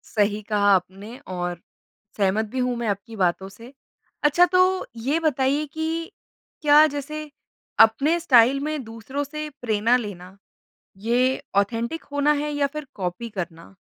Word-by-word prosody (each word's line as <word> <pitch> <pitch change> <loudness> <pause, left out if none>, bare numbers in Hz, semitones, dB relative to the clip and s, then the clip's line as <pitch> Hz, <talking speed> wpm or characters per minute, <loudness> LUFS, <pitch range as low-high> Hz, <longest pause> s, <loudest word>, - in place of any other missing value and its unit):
सही 210 0 +1
कहा 205 -1 +3
आपने 195 +6 -5 0.2
और 175 -1 -4 0.6
सहमत 205 +2 +1
भी 260 - -3
हूँ 250 -1 0
मैं 235 -2 -3
आपकी 200 +3 -4
बातों 190 0 0
से, 230 +6 -14 0.5
अच्छा 300 +4 +5
तो 370 +1 +3 0.2
ये 295 +5 +1
बताइए 285 -1 +1
कि 320 +1 -3 0.5
क्या 300 0 +7
जैसे 305 +2 -5 0.5
अपने 280 +10 +5
स्टाइल 260 -4 +5
में 305 -3 -3
दूसरों 230 +5 -5
से 305 +2 -6
प्रेरणा 230 +1 +2
लेना 195 -4 -8 0.7
ये 240 +2 +2 0.4
ऑथेंटिक 230 +9 0
होना 285 +1 +3
है 300 - -3
या 290 -1 +1
फिर 300 -1 -5
कॉपी 185 +4 -4
करना? 175 -2 -7
240 Hz, 140 wpm, -23 LUFS, 205-295 Hz, 0.7 s, क्या